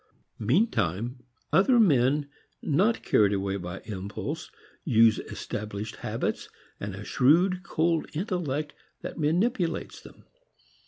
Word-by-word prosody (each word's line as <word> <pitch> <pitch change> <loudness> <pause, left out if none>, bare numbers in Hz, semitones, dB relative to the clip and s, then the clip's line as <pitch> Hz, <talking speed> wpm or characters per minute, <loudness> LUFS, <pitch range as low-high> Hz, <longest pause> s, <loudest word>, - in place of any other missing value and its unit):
Meantime, 115 - 0 0.3
other 240 +6 +5
men, 145 - +3 0.4
not 195 +10 +2
carried 105 -1 +3
away 100 0 -1
by 90 -1 -6
impulse, 110 - -5 0.3
use 115 -5 +4
established 105 0 -6
habits - - -3 0.3
and 100 -1 -5
a 100 - -8
shrewd 175 +8 +3
cold 165 -3 0
intellect 155 - -2 0.3
that - - -6
manipulates 175 +4 0
them. - - -16
140 Hz, 105 wpm, -27 LUFS, 105-175 Hz, 0.4 s, other